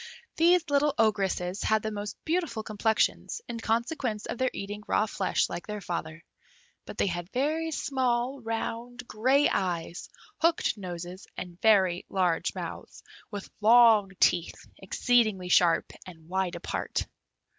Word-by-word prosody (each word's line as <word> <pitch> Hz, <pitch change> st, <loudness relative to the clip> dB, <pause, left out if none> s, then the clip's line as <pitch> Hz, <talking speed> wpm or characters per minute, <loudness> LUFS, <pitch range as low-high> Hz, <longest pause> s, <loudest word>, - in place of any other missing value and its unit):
These 345 Hz, +1 st, +4 dB
little 285 Hz, 0 st, +3 dB
Ogresses 195 Hz, -4 st, +1 dB
had 220 Hz, -1 st, +1 dB
the 220 Hz, -, -2 dB
most 205 Hz, -1 st, -5 dB
beautiful 325 Hz, -9 st, -1 dB
complexions, 220 Hz, -, 0 dB
in 230 Hz, -, -5 dB
consequence 230 Hz, 0 st, -1 dB
of -, -, -5 dB
their 260 Hz, 0 st, +2 dB
eating 205 Hz, +1 st, -6 dB
raw 215 Hz, -, +2 dB
flesh 195 Hz, -3 st, 0 dB
like 175 Hz, -, -6 dB
their 210 Hz, 0 st, -4 dB
father; 165 Hz, -3 st, -5 dB, 0.6 s
but -, -, -8 dB
they -, -, +2 dB
had 175 Hz, -2 st, -3 dB
very 310 Hz, +5 st, 0 dB
small, 260 Hz, -3 st, -1 dB
round, 235 Hz, +2 st, -4 dB
grey 260 Hz, +7 st, +3 dB
eyes, 175 Hz, -2 st, -2 dB, 0.3 s
hooked 335 Hz, -7 st, +2 dB
noses, 180 Hz, -2 st, -7 dB
and 175 Hz, 0 st, -8 dB
very 190 Hz, -5 st, +4 dB
large 180 Hz, -3 st, 0 dB
mouths, -, -, -7 dB, 0.3 s
with 205 Hz, -2 st, -6 dB
long 225 Hz, -2 st, +6 dB
teeth, 175 Hz, -1 st, +1 dB
exceedingly 215 Hz, -2 st, +1 dB
sharp, 175 Hz, -2 st, +3 dB
and 160 Hz, -3 st, -13 dB
wide 185 Hz, 0 st, -1 dB
apart. -, -, -3 dB
215 Hz, 135 wpm, -28 LUFS, 185-245 Hz, 0.6 s, long